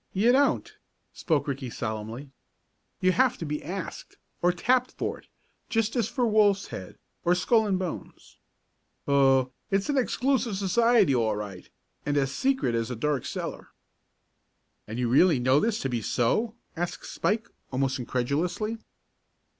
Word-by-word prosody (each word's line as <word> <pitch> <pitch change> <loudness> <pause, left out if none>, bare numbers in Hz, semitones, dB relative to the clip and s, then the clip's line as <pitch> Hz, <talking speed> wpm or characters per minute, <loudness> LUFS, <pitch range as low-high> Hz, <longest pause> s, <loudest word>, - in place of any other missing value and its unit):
"You 215 +6 +4
don't," 280 +3 +2 0.4
spoke 155 -5 0
Ricky 135 -2 -3
solemnly. 110 +5 -5 0.7
"You 185 - +4
have 255 +5 +2
to 165 - -5
be 150 0 -3
asked, 185 0 -6 0.2
or 175 - +4
tapped 250 +8 +1
for - - -3
it, - - -21 0.4
just 225 0 0
as 235 -5 +1
for 250 - 0
Wolf's 210 -3 +3
Head, 95 - -8 0.3
or 175 +1 +3
Skull 220 +4 +3
and 195 -2 +1
Bones. 185 -3 -7 0.7
Oh, 135 -2 +4 0.2
it's 195 +6 0
an 280 -2 +3
exclusive 250 -4 0
society 210 - +4
all 110 -4 +1
right, 100 -3 -7 0.3
and 145 0 0
as 135 -1 +1
secret 260 - +1
as 115 0 -1
a 125 - -3
dark 140 +2 -1
cellar." - - -5 1.2
"And 110 +2 -5
you 125 -1 0
really 150 +6 +5
know 130 +3 +3
this 220 +5 0
to - - -1
be 120 -2 -1
so?" 215 - 0 0.2
asked 175 +1 -4
Spike, 220 +3 -1 0.2
almost 130 0 0
incredulously. 165 - -1
175 Hz, 150 wpm, -27 LUFS, -, 1.2 s, really